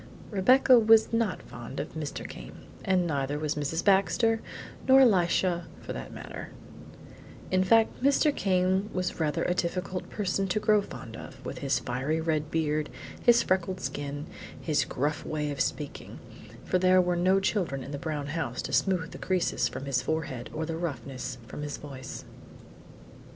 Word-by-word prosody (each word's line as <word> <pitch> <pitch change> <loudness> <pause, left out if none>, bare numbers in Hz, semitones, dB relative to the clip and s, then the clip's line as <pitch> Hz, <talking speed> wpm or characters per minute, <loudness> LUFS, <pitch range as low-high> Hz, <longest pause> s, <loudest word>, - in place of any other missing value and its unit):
Rebecca 250 +5 +6
was 225 0 +5
not 230 -2 0
fond - - -8
of - - -5
Mr. - - -5
Came, - - -10 0.2
and 185 -3 +2
neither 145 -2 -1
was 150 0 -1
Mrs. 150 +3 -2
Baxter, 220 +3 +3 0.5
nor 265 0 +8
Elisha, 180 -5 +3
for - - -6
that - - -7
matter; - - -8 1.0
in 185 0 +3
fact 225 +5 +3
Mr. 280 +2 +3
Came 190 +1 +1
was 185 -1 -2
rather 155 -2 0
a 180 - +1
difficult 180 +1 -2
person 195 -1 -1
to 190 +3 0
grow 210 -1 +4
fond 115 - -9
of, - - -10
with - - -5
his - - +1
fiery 130 +6 -1
red 155 -2 -1
beard, 155 -2 0 0.3
his 240 -1 +5
freckled 185 0 0
skin, 145 -1 -4 0.3
and - - -14
his 155 -3 +2
gruff 150 +4 -2
way 150 -1 -2
of 140 - -2
speaking; 150 -2 -3 0.5
for 185 - +1
there 185 0 +5
were 180 -1 +2
no 185 +3 +3
children 180 -9 -1
in 140 - -8
the 140 - -4
brown 150 -2 -3
house 145 -5 -3
to - - -5
smooth 180 -4 +1
the - - -9
creases 185 -2 +1
from 135 - -6
his 135 -2 +1
forehead 135 -4 -3
or 160 +1 -3
the 165 0 -3
roughness 135 -5 -4
from 145 - -8
his 145 -1 -4
voice. 130 -3 -8
170 Hz, 170 wpm, -28 LUFS, 145-190 Hz, 1.0 s, nor